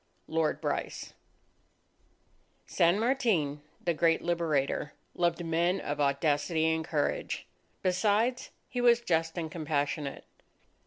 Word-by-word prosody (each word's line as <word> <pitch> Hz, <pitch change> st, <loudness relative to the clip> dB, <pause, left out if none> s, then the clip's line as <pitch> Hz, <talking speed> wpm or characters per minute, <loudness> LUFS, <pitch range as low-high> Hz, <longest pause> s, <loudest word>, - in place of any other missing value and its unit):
_ -, -, -42 dB, 0.2 s
LORD 160 Hz, -1 st, 0 dB
BRYCE -, -, -3 dB, 1.5 s
San 170 Hz, +4 st, +3 dB
Martin, 220 Hz, -, +1 dB, 0.2 s
the 170 Hz, -, 0 dB
great 165 Hz, +1 st, +2 dB
Liberator, 155 Hz, -4 st, 0 dB, 0.2 s
loved 175 Hz, -1 st, 0 dB
men 170 Hz, +3 st, +1 dB
of 145 Hz, -3 st, -3 dB
audacity 145 Hz, +3 st, +1 dB
and 160 Hz, 0 st, -1 dB
courage. 155 Hz, -2 st, -1 dB, 0.4 s
Besides, 210 Hz, +7 st, +1 dB, 0.2 s
he 245 Hz, -, -3 dB
was 240 Hz, -1 st, +6 dB
just 165 Hz, -5 st, 0 dB
and 160 Hz, -2 st, -3 dB
compassionate 145 Hz, -3 st, -2 dB
165 Hz, 110 wpm, -30 LUFS, 150-185 Hz, 1.5 s, was